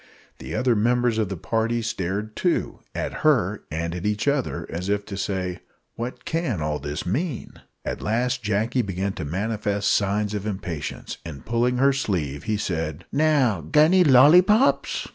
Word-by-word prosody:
The - - -6
other 125 -2 +2
members 120 +1 +2
of 105 -4 0
the 95 - -4
party 115 +5 -1
stared 105 +1 -3
too 175 +5 0 0.2
at - - -3
her - - +2
and 85 +2 -3
at 90 0 -5
each 105 +4 -1
other 140 -2 0
as 90 +4 -4
if 100 0 0
to 100 - -6
say, 95 -2 -3 0.3
"What 120 +2 -6
can 160 - -1
all 75 -1 -2
this 75 +1 -5
mean?" 135 - -3 0.2
At - - -4
last 125 +4 0
Jacky 110 +4 0
began 95 -2 -2
to 80 - -5
manifest 100 +4 -1
signs 105 +1 +1
of 105 0 -3
impatience, 85 -7 -5
and, 70 -6 -9
pulling 120 +2 +1
her 135 +2 +4
sleeve, 85 - -2
he 110 -1 0
said 80 -4 -3
"Now, 140 - +2
g'anny, 155 - +4
lollipops!" 175 - +5
105 Hz, 160 wpm, -24 LUFS, 90-125 Hz, 0.3 s, lollipops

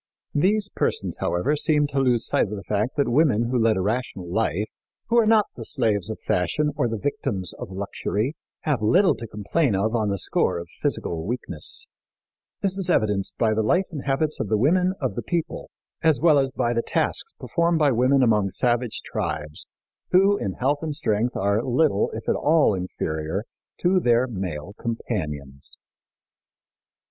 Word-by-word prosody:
These 200 +7 +2
persons, - - -2
however, 90 +13 +1
seemed 150 -1 +2
to 140 - -1
lose 125 -3 +2
sight - - +1
of 105 - -5
the 100 - -7
fact 105 +5 -1
that 140 - +2
women 120 -4 +2
who 125 - +2
lead 110 -2 +3
a - - 0
rational 105 -3 -2
life 105 +1 0 0.4
who 235 - +3
are 225 - +3
not 220 -2 +5
the - - -7
slaves 110 - 0
of 110 - -5
fashion 150 - 0
or 145 -4 +1
the 115 -1 -2
victims 100 -7 -2
of - - -8
luxury 100 +5 -2 0.3
have 145 -7 0
little 180 - +4
to 115 - -7
complain 105 +4 0
of 110 +4 0
on 110 -3 +1
the 100 - -1
score - - +1
of 85 0 -7
physical 80 -2 -1
weakness. 125 - -4 0.8
This 195 -1 0
is 185 -2 -1
evidenced 105 - +1
by 110 -2 +2
the 110 - +1
life 180 - +2
and 150 -5 -6
habits 150 +3 0
of - - -1
the 110 - +2
women 180 - +2
of - - -1
the - - -3
people, 170 -3 -3 0.3
as 160 -6 +3
well 155 -2 +5
as 135 -1 +1
by 120 -2 -1
the 115 - +1
tasks 455 - -1
performed 170 -1 +1
by 150 -3 +4
women 130 +3 +3
among 105 -4 +3
savage 120 +3 0
tribes, 75 0 -4 0.4
who 195 +3 +5
in 100 - -3
health 140 +7 0
and 155 -2 -3
strength 120 -6 0
are 100 +2 +1
little, 130 -3 +2
if 110 - -7
at - - +3
all, 150 -6 +3
inferior 85 -1 -3 0.3
to 185 +1 +3
their 120 -5 +3
male 95 -7 -5
companions. 75 - -4
120 Hz, 180 wpm, -24 LUFS, 100-150 Hz, 0.8 s, not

